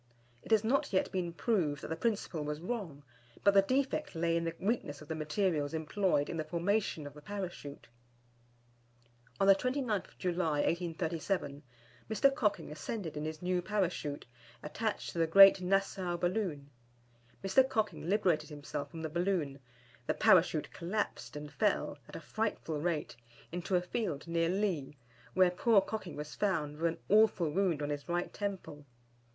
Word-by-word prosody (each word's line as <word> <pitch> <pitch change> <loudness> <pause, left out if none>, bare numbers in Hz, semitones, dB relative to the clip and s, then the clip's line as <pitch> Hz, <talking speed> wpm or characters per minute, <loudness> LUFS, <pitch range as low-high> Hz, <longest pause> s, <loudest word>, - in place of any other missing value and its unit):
It - - -13
has 220 -1 +4
not 255 +5 +1
yet 185 - +1
been 180 -2 -2
proved 170 -6 0
that - - -5
the 160 - -1
principle 200 -7 -1
was 150 0 -3
wrong, 175 -7 -5 0.4
but 200 - +6
the 200 - +7
defect 270 - -1
lay 165 0 +1
in 170 0 0
the 165 0 -3
weakness 195 -9 -1
of 150 - -12
the - - -1
materials 155 -1 0
employed 160 -1 +1
in 165 - -4
the 155 - -1
formation 170 +1 -1
of 145 - -8
the 150 - -12
Parachute. 175 -6 -6 1.5
On - - +4
the 195 - +9
29th 250 -1 -2
July, 170 -5 0
1837, 165 -2 -1 0.5
Mr. 275 +5 +4
Cocking 210 - 0
ascended 160 +3 -5
in 150 +1 -3
his 155 +1 -5
new 180 0 +1
Parachute, 180 -7 -2 0.4
attached 215 +8 -3
to 170 - -4
the 165 - +3
Great 195 +3 +9
Nassau 185 -1 0
Balloon. 175 -6 -2 0.7
Mr. 260 +7 +4
Cocking 215 -8 -1
liberated 190 -7 +2
himself 145 -1 -5
from 165 -1 -8
the - - -1
balloon, 170 -4 -1 0.5
the - - +1
Parachute - - +4
collapsed 170 - -3
and 150 0 -7
fell, 200 -6 0
at - - -10
a - - -4
frightful 165 -4 -2
rate, 160 -6 -1 0.4
into 180 +2 -2
a 180 - +3
field 180 -6 -3
near 165 0 +1
Lea, 180 -8 -1 0.4
where 185 -1 +5
poor 215 +4 +4
Cocking 195 -3 -4
was 150 0 -6
found 155 -8 -1
with 165 0 +1
an - - -13
awful 205 -6 +4
wound 175 -4 +1
on 145 - -2
his 145 +3 -5
right 175 +1 -1
temple. 190 -8 -5
175 Hz, 165 wpm, -33 LUFS, 155-200 Hz, 1.5 s, the